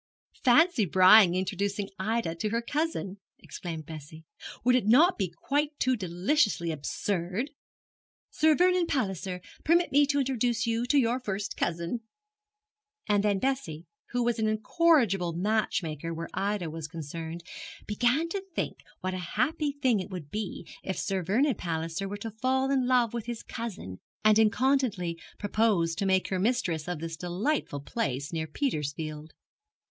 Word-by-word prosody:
'Fancy 305 +1 +5
Brian 185 +2 +7
introducing 195 +2 -1
Ida 215 -3 0
to 190 +6 -2
her 230 +2 -1
cousin!' 285 - -2 0.2
exclaimed 165 -4 -7
Bessie. 160 +1 -10 0.4
'Would 250 +1 +4
it 245 -5 +1
not 310 - +6
be 190 -4 -1
quite 290 - -1
too 255 0 +2
deliciously 185 - +1
absurd? 180 - -2 0.8
"Sir 315 0 +4
Vernon 360 0 +3
Palliser, 190 - -2 0.2
permit 345 +3 +3
me 285 +1 +5
to 285 0 +1
introduce 245 -3 +1
you 230 +1 0
to 290 - +3
your 245 -1 +2
first 205 -4 -3
cousin!" 170 +8 -2 1.1
And 205 -1 +3
then 205 -2 +2
Bessie, 190 - -2 0.2
who 245 0 0
was 235 -1 0
an 220 - +2
incorrigible 215 - +2
matchmaker 170 -5 -1
where 165 0 -5
Ida 195 -4 -1
was 160 -1 -6
concerned, 165 +1 -6 0.4
began 245 +9 +1
to 390 +3 -3
think - - -2 0.2
what 185 0 -2
a 185 - -3 0.2
happy 295 +4 +1
thing 260 -6 +1
it 185 - -5
would 175 -7 -7
be 210 -4 -4 0.2
if 190 - -4
Sir 190 -1 -1
Vernon 240 - +2
Palliser 165 +1 -3
were 205 - -4
to 225 +2 -6
fall 260 +4 0
in 260 -2 +2
love 245 -3 +3
with 235 -1 -4
his 240 -1 -5
cousin, 195 - -6 0.3
and 215 0 +6
incontinently 220 -7 +2 0.2
propose 205 -5 +1
to 195 +4 -1
make 190 -1 +2
her 190 - -1
mistress 185 -8 0
of 180 -1 -2
this 165 0 -4
delightful 180 - -2
place 140 - -3
near 160 -1 -2
Petersfield. 155 - -3
205 Hz, 150 wpm, -28 LUFS, 170-250 Hz, 1.1 s, Brian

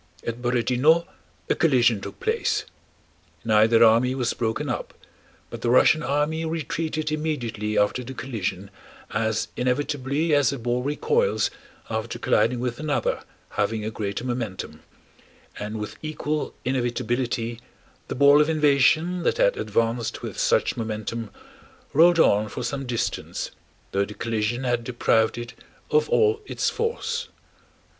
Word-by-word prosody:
At 115 +1 -4
Borodinó 125 +7 +3 0.4
a - - +3
collision 120 -9 +3
took - - -8
place. 460 -1 0 0.8
Neither 110 +1 +5
army 115 +3 +4
was 125 -3 0
broken 115 +6 -2
up, 120 - -4 0.6
but - - -7
the 120 - 0
Russian 140 +5 +5
army 150 +4 0
retreated 160 -1 -2
immediately 120 -9 -2
after 105 +5 +2
the 130 +2 -8
collision 100 -6 -4 0.4
as 110 0 0
inevitably 140 +4 0
as 145 -4 +4
a 140 - -4
ball 120 +1 -1
recoils 450 - +1 0.4
after 110 0 -3
colliding 115 +3 +2
with 120 -1 -3
another 145 -6 -1 0.3
having 105 +1 -1
a 110 - -2
greater 100 0 -4
momentum, 120 -6 -4 0.8
and 105 +1 -4
with 105 - -6
equal 155 -1 -3
inevitability 120 -2 -1 0.5
the - - -4
ball 140 +2 +6
of 150 - +2
invasion 155 +3 +3
that 170 - +1
had - - +3
advanced 115 - -1
with - - -5
such - - +2
momentum 110 0 -4 0.6
rolled 170 +3 +6
on 105 -9 +4
for 125 - -5
some 135 +2 -3
distance, 120 -2 -3 0.4
though 100 +1 +1
the 105 - -10
collision 115 +2 -1
had 120 -2 0
deprived 115 -2 +1
it 120 +1 -6 0.4
of 150 0 +3
all 435 0 +3
its - - 0
force. 470 +1 -2
125 Hz, 135 wpm, -24 LUFS, 115-150 Hz, 0.8 s, ball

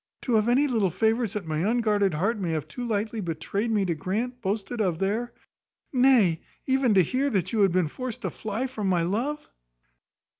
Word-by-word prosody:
to 250 - -2
have 220 +1 +3
any 265 +4 +4
little 225 -8 +1
favours 220 +3 +1
that 210 -5 -4
my 155 -1 -2
unguarded 205 -2 +1
heart 205 +8 0
may 180 -3 -2
have 155 -2 -3
too 245 - -6
lightly 220 -1 -2
betrayed 180 +6 -2
me 210 -3 +1
to 175 - 0
grant, 225 +10 -3
boasted 215 +3 -2
of 180 -5 0
there! 215 +6 -1 0.6
nay, 245 -10 +4 0.2
even 260 -5 +2
to 190 - +6
hear 260 - 0
that 185 -5 -1
you 225 - +1
had 195 -3 +4
been 180 -2 +2
forced 255 - -6
to - - -2
fly 220 +4 -3
from 225 -6 -3
my 180 -3 +2
love!" 240 - -2
215 Hz, 195 wpm, -26 LUFS, 185-240 Hz, 0.6 s, to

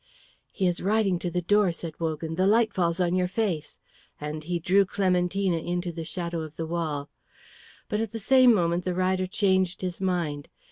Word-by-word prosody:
"He 190 - -1
is 175 -1 0
riding 200 -3 +1
to 175 - -2
the 180 +1 -2
door," 205 +1 +3
said 165 -2 -7
Wogan. 160 0 -3
"The 185 +3 +2
light 225 +2 +3
falls 170 -2 0
on 175 -1 +1
your 180 0 +2
face;" 180 -6 -2 0.4
and 150 +1 -5
he 175 +2 -2
drew 185 +4 +3
Clementina 185 -1 0
into 175 +1 -3
the 165 0 -6
shadow 170 +1 -3
of 155 -1 -8
the 165 - -3
wall. 160 -4 -3 0.8
But 210 0 -1
at 225 -3 -3
the 230 - -5
same 255 +3 +5
moment 175 -4 +1
the 180 0 -2
rider 185 0 +1
changed 190 -2 +1
his 180 0 -4
mind. 165 -6 -1
180 Hz, 190 wpm, -26 LUFS, 165-190 Hz, 0.8 s, same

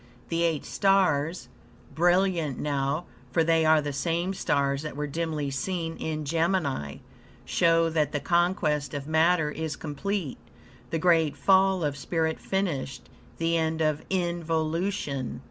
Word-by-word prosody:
The 165 0 0
eight 165 -3 0
stars, 175 -7 +1 0.5
brilliant 175 -4 +2
now 140 +3 -1 0.3
(for 165 - +3
they 165 0 +3
are 155 -1 +5
the 145 -1 -3
same 170 +6 -1
stars 140 -6 0
that 155 -2 -6
were 150 +1 -2
dimly 150 -1 -2
seen 165 +4 -3
in 155 -1 -3
Gemini), 160 - 0 0.5
show 165 0 +3
that 155 -3 +1
the 145 - -1
conquest 165 -4 +1
of 140 -1 -4
matter 160 0 +2
is 160 -1 -4
complete, 160 +1 -4 0.5
the 165 - -1
great 160 -4 +3
fall 190 +4 +4
of 145 -2 -1
spirit 160 +3 -1
finished; 165 -10 -3 0.3
the 165 0 +1
end 160 -1 0
of 155 -2 +1
involution. 165 -5 -1
160 Hz, 135 wpm, -27 LUFS, 145-175 Hz, 0.5 s, are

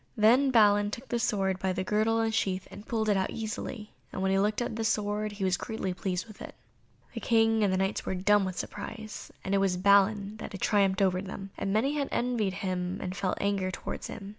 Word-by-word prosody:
Then 240 +6 +5
Balin 205 -4 +5
took 235 +5 -8
the 240 - 0
sword 195 -4 0
by 190 0 0
the 185 - -2
girdle 215 +3 +1
and 225 0 0
sheath, 190 -4 -1
and 205 - -11
pulled 220 -2 -1
it 205 - +3
out 190 -1 0
easily, 220 0 -5 0.2
and 190 - -4
when 190 - +2
he 195 - +3
looked 210 +2 +1
at 240 -2 -2
the 225 - -2
sword 210 -1 0
he 200 -1 -5
was 185 -1 +2
greatly 220 -5 -3
pleased 185 -1 -3
with 215 - -14
it. - - -8 0.6
The - - -4
King 225 -1 +3
and 200 - +3
the 185 - +1
Knights 195 +2 -1
were 190 - -2
dumb 205 +2 +3
with 185 -1 -4
surprise 215 -1 -7
that 195 - -2
it 200 - +4
was 190 -2 +1
Balin 200 +2 +3
who - - -5
had 195 - -7
triumphed 195 -1 +2
over 185 -1 +2
them, 195 0 -7
and 195 - -2
many 270 +8 +1
of 275 - -2
them - - -1
envied 235 -6 0
him 185 -1 -2
and 185 0 -4
felt 185 0 -1
anger 200 -2 0
towards 185 - -5
him. 200 -2 -8
205 Hz, 240 wpm, -29 LUFS, 190-220 Hz, 0.6 s, Then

